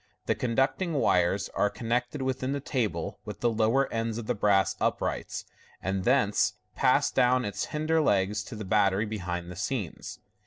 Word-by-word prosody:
The - - +2
conducting 135 +8 0
wires 95 - +2
are 105 - +1
connected 125 +5 -2
within 130 +1 -1
the 140 - -1
table 125 -6 -2
with - - -8
the 120 - +3
lower 115 +5 +2
ends 115 -1 -1
of 120 - -5
the 125 - 0
brass 100 -3 +2
uprights, - - -1 0.3
and 95 0 -2
thence - - +3 0.2
pass - - +3
down 125 0 +3
its 105 - -2
hinder 155 +1 0
legs 105 -4 +1
to 125 - -8
the 105 -1 -6
battery 100 +1 +2
behind 90 -5 -4
the - - -8
scenes.. 100 - -4
115 Hz, 165 wpm, -28 LUFS, 100-130 Hz, 0.3 s, the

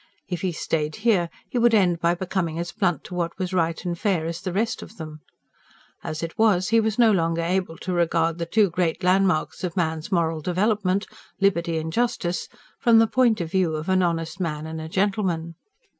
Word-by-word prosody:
If 180 -3 -4
he 185 - 0
stayed 155 -1 -2
here, 185 -7 +3 0.2
he 245 - -2
would 235 -1 +5
end 180 -5 +3
by 170 +1 +2
becoming 175 -2 -2
as 170 +1 -3
blunt 175 -7 0
to - - -10
what 170 -1 -2
was 185 -1 -3
right 165 -2 0
and 175 -1 -1
fair 180 -4 0
as 165 0 -4
the 185 - -3
rest 225 +5 -1
of 225 - -12
them. 155 -1 -8 0.8
As 155 +1 -4
it 165 +4 -6
was, 195 -5 +3
he 230 +1 +4
was 220 -1 0
no 235 -2 +6
longer 165 -3 +1
able 180 -1 -1
to 185 - -4
regard 165 -1 +1
the 170 - -3
two 205 0 +3
great 175 +1 -1
landmarks 185 -3 +2
of 180 0 -3
man's 160 +1 -1
moral 165 -3 +1
development 195 +2 +1 0.3
liberty 170 -4 +1
and 160 0 -4
justice 230 -7 -1 0.3
from 235 -3 +5
the 225 - +6
point 230 -3 +2
of 165 -1 -4
view 185 -4 +1
of 155 +3 -4
an 185 0 +3
honest 165 -1 -1
man 155 -4 -3
and 160 0 -5
a 160 - -7
gentleman. 185 -3 0
175 Hz, 205 wpm, -24 LUFS, 165-195 Hz, 0.8 s, no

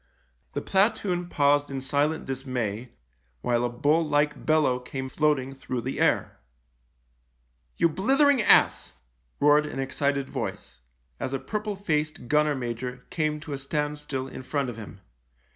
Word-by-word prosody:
The - - -3
platoon 190 -3 +1
paused 145 -1 +3
in 135 -1 -3
silent 145 +4 0
dismay, 125 -4 -3 0.5
while 120 - +1
a 120 - +1
bull 145 +7 +2
like 150 -1 0
bellow 155 -5 +3
came 130 +1 -6
floating 140 -2 +1
through 130 -2 -4
the 130 +3 -4
air. - - +1 0.7
" - - -43
You - - +4
blithering 270 - +3
ass," - - +4 0.5
roared 150 +1 +5
an - - -6
excited 140 +1 -1
voice, - - -5 0.4
as 130 - -3
a 135 - -1
purple 210 +3 -3
faced 155 -9 -2
gunner 150 +2 +3
major 125 0 -5
came 155 -2 0
to 155 -2 -6
a 135 - -4
standstill 145 -1 -3
in - - -8
front 135 -1 -2
of 115 - -11
him. 105 -3 -10
140 Hz, 145 wpm, -26 LUFS, 125-150 Hz, 0.7 s, roared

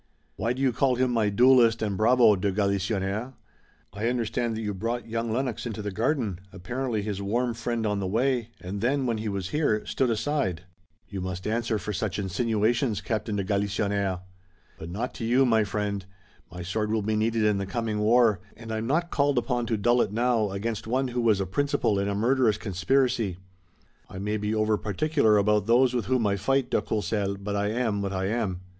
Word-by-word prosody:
"Why 115 - -1
do 130 +2 -3
you 130 - +3
call 130 +2 +2
him 130 0 +1
my 115 -3 +2
duelist 115 +1 +5
and 105 -2 -1
bravo, 115 +1 +5
de 100 +1 0
Galisonnière?" 100 +3 -1 0.6
"I 105 +3 -2
understand 120 -1 -1
that - - -3
you 105 -1 -2
brought 115 +4 -3
young 115 0 -2
Lennox 125 0 -2
into 110 -2 -5
the 105 - -3
garden, 110 - -1
apparently 110 +4 -3
his 100 -2 -3
warm 120 +5 0
friend 115 0 -2
on 105 -1 0
the 95 - -2
way, 120 +3 0
and 95 +3 -5
then 135 +3 +1
when 115 -3 -1
he 110 0 -3
was 95 -2 -3
here, 145 -9 0
stood 130 - 0
aside." 110 - -1 0.4
"You 100 -2 -5
must 90 0 -5
answer 115 0 0
for 105 0 -4
such 105 -1 -2
insinuations, 110 +3 0
Captain 110 -1 -2
de 100 - -1
Galisonnière." 100 -1 -1 0.6
"But 80 - -7
not 110 +8 -3
to - - -7
you, 125 +4 +3
my 110 -3 +3
friend. 100 -1 -2 0.5
My 90 +1 -7
sword 105 +4 -2
will 110 -1 0
be 110 +1 0
needed 110 +1 +1
in 105 -2 +2
the 100 - -3
coming 110 0 -2
war, 110 -2 +4 0.2
and 115 -1 -8
I'm 110 +1 -2
not 170 +6 0
called 140 -2 +2
upon 120 -1 0
to 110 - 0
dull 120 +4 +3
it - - 0
now 115 -1 +1
against 105 +3 -4
one 130 +3 0
who 120 0 -1
was 110 -4 +3
a 95 - 0
principal 140 - 0
in 100 - 0
a 100 - -1
murderous 115 0 +2
conspiracy. 105 0 0 0.7
I - - -9
may 105 +2 -2
be 105 +1 -2
over 110 0 +2
particular 110 - +2
about 105 0 +2
those 125 +2 +4
with 120 -2 -1
whom 130 -3 +1
I 100 -1 +1
fight, 135 +5 0
de - - +2
Courcelles, 100 -1 -1
but 100 +1 -4
I 100 0 0
am 110 -2 0
what 100 -1 -3
I 95 0 -1
am." 100 -4 -1
110 Hz, 205 wpm, -26 LUFS, 100-120 Hz, 0.7 s, duelist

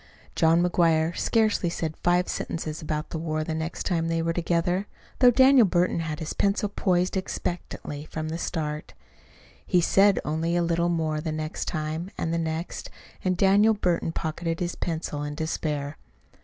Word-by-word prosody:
John 165 +1 +4
McGuire 170 -2 +2
scarcely 215 -6 +2
said 160 -2 -3
five 175 +1 +2
sentences 160 -1 -4
about 155 0 -3
the 160 - -3
war 155 -1 -2
the 160 - -3
next 160 +1 -4
time 165 -3 0
they 165 0 0
were 165 0 0
together, 175 +3 0 0.3
though 250 - +8
Daniel 260 -2 +6
Burton 175 -1 +1
had 160 -2 -3
his 155 - -4
pencil 200 +1 +1
poised 185 -2 +1
expectantly 175 -5 -4
from 155 0 -5
the 165 +1 -4
start. 150 -3 -4 0.7
He 180 - +2
said 195 +3 +4
only 160 +3 0
a 175 - +2
little 170 0 +1
more 160 -3 0
the 160 0 -3
next 155 0 -3
time, 155 +3 -3
and 165 - -1
the 170 - 0
next; 160 +1 -4 0.3
and 185 -1 +1
Daniel 200 +4 +5
Burton 175 -4 0
pocketed 165 +1 -3
his 175 -1 -2
pencil 160 -3 -3
in 145 0 -4
despair. 150 -2 -3
165 Hz, 170 wpm, -26 LUFS, 155-180 Hz, 0.7 s, though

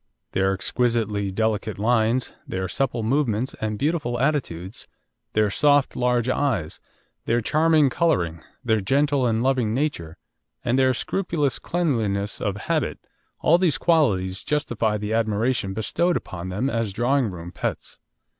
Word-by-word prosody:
Their 95 0 +2
exquisitely 105 -1 0
delicate 110 +1 -1
lines, 115 +3 +1
their 95 0 -3
supple 125 +2 -1
movements 125 -1 0
and 110 -1 -2
beautiful 140 -3 -1
attitudes, 120 - -2 0.5
their 105 -1 +2
soft 145 +3 +3
large 125 -1 +1
eyes, 125 - -1 0.4
their 120 +1 +2
charming 155 +2 +3
colouring, 85 - 0 0.2
their 110 -2 +3
gentle 140 +5 +2
and 115 0 +1
loving 125 -5 +1
nature, 130 - -2 0.5
and 120 +2 +2
their 130 -1 +3
scrupulous 165 -3 -1
cleanliness 110 - -1
of 100 -1 -1
habit - - -1 0.4
all 170 +2 +4
these 170 -7 +2
qualities 100 - +1
justify 115 -7 0
the 105 +1 -3
admiration 110 -2 0
bestowed 170 - +1
upon 90 0 -7
them 105 +8 -1
as 115 -5 -1
drawing 125 +2 +1
room 85 -2 -8
pets. - - -5
115 Hz, 135 wpm, -24 LUFS, 105-140 Hz, 0.5 s, all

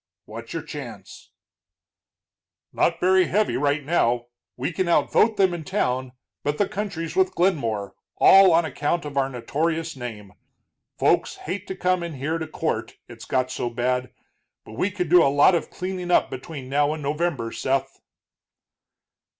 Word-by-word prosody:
"What's - - -9
your - - -4
chance?" - - -9 1.4
"Not - - +1
very 185 0 +4
heavy 210 +2 +1
right 145 +1 0
now. 120 -7 +1 0.3
We 130 +7 -2
can 185 +2 -1
out 170 - +2
vote 220 -1 +3
them 190 -3 +3
in 170 -2 -5
town, 130 -9 -1 0.3
but 145 +1 -1
the 205 - +1
country's 200 -6 -4
with 375 0 +2
Glenmore, 115 - 0 0.2
all 195 -1 +7
on 165 0 +4
account 160 +2 -2
of 145 -1 -7
our 135 -1 +1
notorious 160 +6 -2
name. 110 -6 -8 0.6
Folks - - +2
hate 200 - -6
to 190 - -5
come 185 -1 +1
in 170 -3 -5
here 155 +5 -2
to 160 - -4
court, - - -3
it's - - -11
got 130 0 0
so 120 - -2
bad. 125 +2 -1 0.5
But - - -12
we 185 - 0
could 185 -3 -3
do 175 +2 +6
a - - +4
lot 145 +6 +5
of 170 - -1
cleaning 180 -1 -5
up 175 - +3
between 130 +1 -7
now 145 +2 +1
and 155 - -8
November, 145 -5 -1
Seth." 135 0 -2
155 Hz, 165 wpm, -24 LUFS, 130-180 Hz, 1.4 s, all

